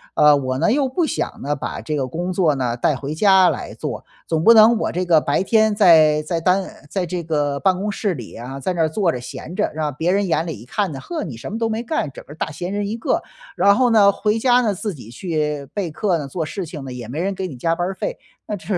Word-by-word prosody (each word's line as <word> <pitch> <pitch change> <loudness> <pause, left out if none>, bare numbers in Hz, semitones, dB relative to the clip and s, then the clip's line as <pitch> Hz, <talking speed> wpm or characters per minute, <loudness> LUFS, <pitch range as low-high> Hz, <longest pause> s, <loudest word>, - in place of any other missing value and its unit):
呃， 150 -1 +6
我 130 -1 -2
呢， 220 - +3
又 275 +1 +2
不 320 +6 0
想 315 - -3
呢， 145 +2 -1
把 140 - -5
这 155 -1 -3
个 135 -2 -1
工 175 +7 -3
作 170 -5 +2
呢 125 -3 -1
带 140 +4 +1
回 140 +2 -5
家 190 0 +5
来 - - -4
做。 - - -6 0.2
总 160 -1 0
不 230 - +8
能 225 +1 +7
我 - - -1
这 180 +1 -2
个 170 -3 +5
白 145 +1 0
天 220 +1 +3
在 160 -6 +6
在 165 +2 -2
单 185 +3 +2 0.3
在 190 +1 -1
这 175 0 -4
个 145 -3 -1
办 190 -2 +2
公 205 +3 -2
室 200 -1 -1
里 120 -8 -9
啊， 130 +4 -7
在 185 +7 -2
那 170 - -1
儿 160 - +1
坐 175 +1 +1
着 125 - -4
闲 155 +7 -8
着， 210 - 0
让 150 -2 -2
别 165 +5 0
人 200 0 +1
眼 160 -1 +1
里 160 - -5
一 115 - -12
看 195 +7 -2
呢， 135 - -6
“嗬， 335 -3 -4
你 135 - -6
什 115 - -8
么 220 - -3
都 230 0 0
没 225 +1 -2
干， 245 - -2
整 - - -11
个 145 - -11
大 160 - -3
闲 175 +4 -5
人 205 0 -2
一 215 - -3
个。” 230 - 0 0.4
然 200 0 +5
后 250 +1 +3
呢， 210 -3 +6
回 210 +2 0
家 245 +1 +4
呢， 220 -4 +1
自 205 +1 -4
己 120 -6 -12
去 150 0 -3
备 195 -5 -2
课 185 +2 0
呢， 145 - -5
做 160 +3 -3
事 185 +5 -5
情 150 -3 -8
呢， 130 - -6
也 120 -3 -7
没 135 +7 -5
人 195 +3 -1
给 190 0 -3
你 140 -7 -9
加 165 +6 0
班 175 +1 -1
儿 195 - -4
费， - - -4 0.3
那 210 - -3
这 195 - -12
175 Hz, 295 characters per minute, -20 LUFS, 150-205 Hz, 0.4 s, 不